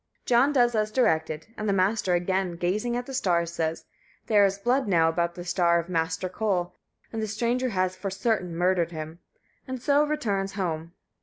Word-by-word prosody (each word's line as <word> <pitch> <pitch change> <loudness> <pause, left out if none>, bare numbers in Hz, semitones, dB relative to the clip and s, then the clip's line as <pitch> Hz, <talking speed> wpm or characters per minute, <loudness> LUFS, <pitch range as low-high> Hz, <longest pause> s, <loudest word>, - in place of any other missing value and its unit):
John 250 +4 +4
does 245 -4 +3
as 215 -1 0
directed, 160 -10 +1
and 215 -1 -2
the - - +3
Master, 190 -1 +2
again 185 0 0
gazing 210 +8 -1
at 245 - -4
the 270 - -8
stars, 170 -8 0
says: 160 -1 -2 0.4
"There 210 -2 +4
is 195 0 -3
blood 245 +5 +1
now 165 -4 +4
about 170 +1 -1
the 175 - -7
star 175 -1 +2
of 170 +1 -3
Master 165 +1 -1
Koll, 185 -2 -1 0.4
and 225 - -2
the 215 - -2
stranger 240 +4 0
has 185 -3 0
for 185 +2 -4
certain 195 -3 -1
murdered 180 -1 +2
him," 160 +1 -7 0.5
and 260 -1 -4
so 285 +4 +3
returns 210 -11 -1
home. 165 -4 -3
190 Hz, 185 wpm, -26 LUFS, 170-225 Hz, 0.5 s, John